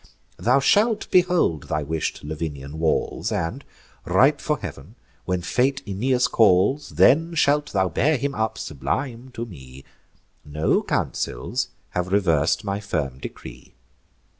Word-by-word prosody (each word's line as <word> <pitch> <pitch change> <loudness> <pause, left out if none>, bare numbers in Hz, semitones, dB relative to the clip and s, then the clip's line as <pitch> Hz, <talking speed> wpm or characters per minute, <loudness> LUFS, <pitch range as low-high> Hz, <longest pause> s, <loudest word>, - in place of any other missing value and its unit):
Thou 125 +4 +3
shalt 210 - +2
behold 175 - +2
thy 75 0 -1
wish'd 80 +2 -3
Lavinian 75 -1 -5
walls; 80 -1 0
And, 105 +12 -2 0.4
ripe - - +3
for - - 0
heav'n, - - -9 0.3
when 90 -1 -1
fate 135 +7 0
Aeneas 125 +6 +1
calls, 110 +7 +3
Then 165 +4 +4
shalt 145 -1 +2
thou 95 -2 +2
bear 140 - +1
him 140 +3 -2
up, 110 -2 -2
sublime, 120 - -4
to 115 - -4
me: 70 - -12 0.6
No 75 +1 +1
councils - - -2 0.2
have 90 +1 -2
revers'd 85 -1 +2
my 100 -1 -2
firm 75 -10 -3
decree. - - -10
100 Hz, 130 wpm, -23 LUFS, -, 0.6 s, Then